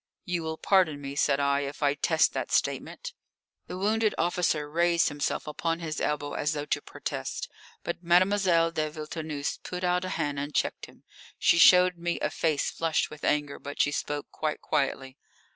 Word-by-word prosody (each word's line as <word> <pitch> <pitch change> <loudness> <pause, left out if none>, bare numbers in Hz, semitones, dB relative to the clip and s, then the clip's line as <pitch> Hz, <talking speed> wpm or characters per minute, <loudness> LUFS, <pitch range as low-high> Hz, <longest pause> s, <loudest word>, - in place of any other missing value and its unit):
"You 175 -1 -1
will 160 0 -4
pardon 180 -7 +2
me," 140 0 -6
said 140 -1 +2
I, 140 0 +2
"if 140 +1 -5
I 140 -1 +4
test - - +2
that - - -3
statement." - - -1 0.5
The 180 - -6
wounded 215 +2 +1
officer 170 -4 0
raised 170 +2 +2
himself 145 -1 -2
upon 165 +2 -2
his 160 -3 -4
elbow 145 -1 -1
as 150 +2 0
though 145 -1 -3
to - - -1
protest, - - -5 0.4
but 170 +1 -4
Mademoiselle 175 -1 +3
de 155 -2 -1
Villetaneuse 155 -1 -5
put 180 0 -6
out 180 0 +1
a 185 - -3
hand 145 -6 -2
and 145 +1 -5
checked - - -1
him. - - -19 0.3
She 170 - +4
showed 180 0 +7
me 170 0 -2
a - - -1
face 155 -3 0
flushed 165 -1 0
with 155 - -11
anger, 145 -1 0
but 145 0 -8
she 145 - +3
spoke 145 0 -4
quite 155 -1 -2
quietly. 135 -1 -2
155 Hz, 180 wpm, -28 LUFS, 145-175 Hz, 0.5 s, showed